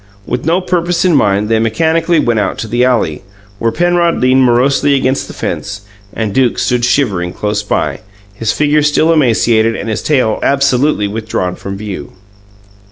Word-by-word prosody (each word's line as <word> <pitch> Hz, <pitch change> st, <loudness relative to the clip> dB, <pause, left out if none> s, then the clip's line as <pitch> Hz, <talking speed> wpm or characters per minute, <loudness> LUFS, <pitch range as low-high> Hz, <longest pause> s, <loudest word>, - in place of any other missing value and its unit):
With 125 Hz, +4 st, -3 dB
no 175 Hz, +3 st, +2 dB
purpose 175 Hz, -1 st, -1 dB
in 175 Hz, -4 st, +3 dB
mind, 105 Hz, -5 st, +2 dB
they 110 Hz, 0 st, +1 dB
mechanically 160 Hz, +9 st, +1 dB
went 120 Hz, -6 st, +1 dB
out 100 Hz, -2 st, -2 dB
to 115 Hz, -, -5 dB
the 120 Hz, +3 st, 0 dB
alley, 120 Hz, -12 st, 0 dB, 0.4 s
where 115 Hz, -, 0 dB
Penrod 175 Hz, +1 st, +1 dB
leaned 130 Hz, +1 st, +3 dB
morosely 130 Hz, +3 st, +2 dB
against 130 Hz, 0 st, 0 dB
the -, -, -9 dB
fence, 100 Hz, 0 st, -4 dB, 0.3 s
and 110 Hz, -3 st, -3 dB
Duke 130 Hz, -1 st, +1 dB
stood 125 Hz, -1 st, 0 dB
shivering 100 Hz, -10 st, 0 dB
close 105 Hz, 0 st, -2 dB
by, 105 Hz, -, -2 dB, 0.3 s
his 105 Hz, +1 st, -2 dB
figure 150 Hz, 0 st, +1 dB
still 150 Hz, +2 st, +2 dB
emaciated 115 Hz, -5 st, +2 dB
and -, -, -5 dB
his 110 Hz, -, -2 dB
tail 130 Hz, -8 st, +1 dB
absolutely 140 Hz, -4 st, +1 dB
withdrawn 105 Hz, -4 st, -3 dB
from 100 Hz, 0 st, -7 dB
view. 100 Hz, -8 st, -7 dB
120 Hz, 165 wpm, -13 LUFS, 105-150 Hz, 0.4 s, in